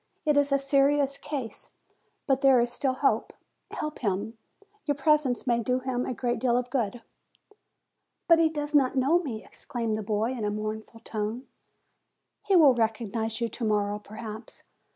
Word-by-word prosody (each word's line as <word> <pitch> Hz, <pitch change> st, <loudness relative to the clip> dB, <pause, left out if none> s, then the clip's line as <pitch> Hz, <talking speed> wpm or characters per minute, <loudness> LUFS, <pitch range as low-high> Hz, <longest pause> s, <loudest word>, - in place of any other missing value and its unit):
It 300 Hz, -1 st, +3 dB
is 285 Hz, 0 st, +3 dB
a 275 Hz, -, +4 dB
serious 275 Hz, 0 st, +2 dB
case, 275 Hz, -6 st, -6 dB, 0.6 s
but 270 Hz, -1 st, +1 dB
there 270 Hz, -3 st, +6 dB
is 240 Hz, 0 st, 0 dB
still 260 Hz, 0 st, 0 dB
hope. 245 Hz, -5 st, +1 dB, 0.4 s
Help 305 Hz, 0 st, -5 dB
him. 205 Hz, +1 st, -2 dB, 0.5 s
Your 290 Hz, -, +1 dB
presence 280 Hz, -3 st, +2 dB
may 240 Hz, -2 st, +2 dB
do 250 Hz, +2 st, 0 dB
him 255 Hz, -1 st, -2 dB
a -, -, -2 dB
great 240 Hz, -1 st, -1 dB
deal 245 Hz, 0 st, +2 dB
of 250 Hz, 0 st, -3 dB
good." 240 Hz, -2 st, -2 dB, 1.2 s
"But 335 Hz, -1 st, +6 dB
he 325 Hz, -1 st, +4 dB
does 295 Hz, -1 st, -4 dB
not 275 Hz, -3 st, +3 dB
know 275 Hz, +6 st, +3 dB
me!" 240 Hz, -11 st, -6 dB
exclaimed 230 Hz, -3 st, -4 dB
the 215 Hz, -, -3 dB
boy 215 Hz, +3 st, -1 dB
in 245 Hz, -4 st, -4 dB
a 210 Hz, -, +1 dB
mournful 215 Hz, +2 st, -5 dB
tone. 220 Hz, +3 st, -4 dB, 1.0 s
"He 395 Hz, -, +1 dB
will 300 Hz, -7 st, +7 dB
recognize 225 Hz, -1 st, -1 dB
you 235 Hz, -, +1 dB
to 235 Hz, -, -7 dB
morrow, 210 Hz, -1 st, 0 dB
perhaps. 215 Hz, +1 st, -9 dB
245 Hz, 170 wpm, -27 LUFS, 220-275 Hz, 1.2 s, will